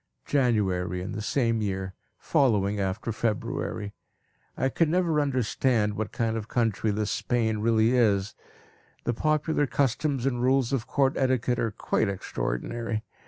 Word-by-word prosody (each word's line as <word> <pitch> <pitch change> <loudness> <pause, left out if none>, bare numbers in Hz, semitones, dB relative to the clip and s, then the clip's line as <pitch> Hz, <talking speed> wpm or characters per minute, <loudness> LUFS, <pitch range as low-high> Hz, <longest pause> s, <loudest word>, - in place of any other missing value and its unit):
January 95 -9 +1
in 90 - -5
the 105 - -4
same 115 -1 +1
year, 95 -2 -3 0.2
following 105 -6 +2
after 95 +4 -2
February. 105 -2 -2 0.6
I 130 - +1
can 160 +4 +1
never 165 -3 +2
understand 125 -5 +1
what 105 0 -3
kind 115 -1 -1
of 110 -2 -3
a - - -30
country 115 -3 0
this 105 0 -1
Spain 110 -3 0
really 110 +1 +3
is. 105 -4 +2 0.7
The 120 - 0
popular 155 +2 +1
customs 135 0 0
and 120 -3 0
rules 130 0 +2
of 130 -2 -1
court 135 0 +2
etiquette 130 -2 +1
are 115 - +1
quite 105 0 -1
extraordinary. 110 - -3
115 Hz, 145 wpm, -27 LUFS, 105-130 Hz, 0.7 s, really